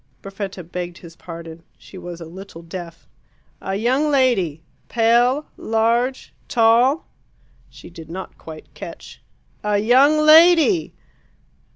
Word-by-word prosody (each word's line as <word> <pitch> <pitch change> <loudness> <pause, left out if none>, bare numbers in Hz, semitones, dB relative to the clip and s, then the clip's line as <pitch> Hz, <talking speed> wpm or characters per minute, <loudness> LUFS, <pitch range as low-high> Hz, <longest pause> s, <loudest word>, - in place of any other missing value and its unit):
Perfetta 195 -2 -7
begged 175 +1 -6
his 165 -2 -14
pardon: 165 -1 -10 0.2
she - - -16
was 175 -2 -8
a 165 - -8
little 175 0 -11
deaf. 170 -1 -9 0.5
"A 195 - -3
young 255 +8 +1
lady 215 - +1 0.3
pale, 240 +5 +2
large, 235 +4 -1
tall." 245 +7 +3 0.6
She - - -14
did 165 -2 -12
not 185 +3 -8
quite 160 -1 -12
catch. - - -11 0.4
"A 210 0 +1
YOUNG 260 +8 +4
LADY!" 330 +2 +5
210 Hz, 115 wpm, -20 LUFS, 175-255 Hz, 0.6 s, LADY